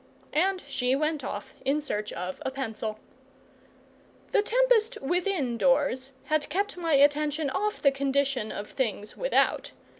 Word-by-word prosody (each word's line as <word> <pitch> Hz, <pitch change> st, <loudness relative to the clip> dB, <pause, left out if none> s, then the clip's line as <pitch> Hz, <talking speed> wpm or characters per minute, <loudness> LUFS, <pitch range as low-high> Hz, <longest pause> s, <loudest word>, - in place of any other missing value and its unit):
And 370 Hz, +4 st, +1 dB
she 260 Hz, -2 st, +1 dB
went 305 Hz, +1 st, -1 dB
off -, -, -5 dB
in 280 Hz, +3 st, +2 dB
search 210 Hz, -8 st, -3 dB
of 180 Hz, +1 st, -5 dB
a -, -, -1 dB
pencil. 220 Hz, -5 st, -4 dB, 1.3 s
The -, -, +4 dB
tempest 485 Hz, 0 st, +3 dB
within 310 Hz, -5 st, -1 dB
doors 270 Hz, -1 st, +2 dB
had 310 Hz, -1 st, 0 dB
kept 405 Hz, +3 st, -1 dB
my 335 Hz, -3 st, -1 dB
attention 290 Hz, +1 st, +3 dB
off 420 Hz, +6 st, -2 dB
the 280 Hz, -, +6 dB
condition 275 Hz, -4 st, 0 dB
of 205 Hz, -, -6 dB
things 215 Hz, -5 st, -2 dB
without. -, -, +1 dB
285 Hz, 140 wpm, -28 LUFS, 260-355 Hz, 1.3 s, the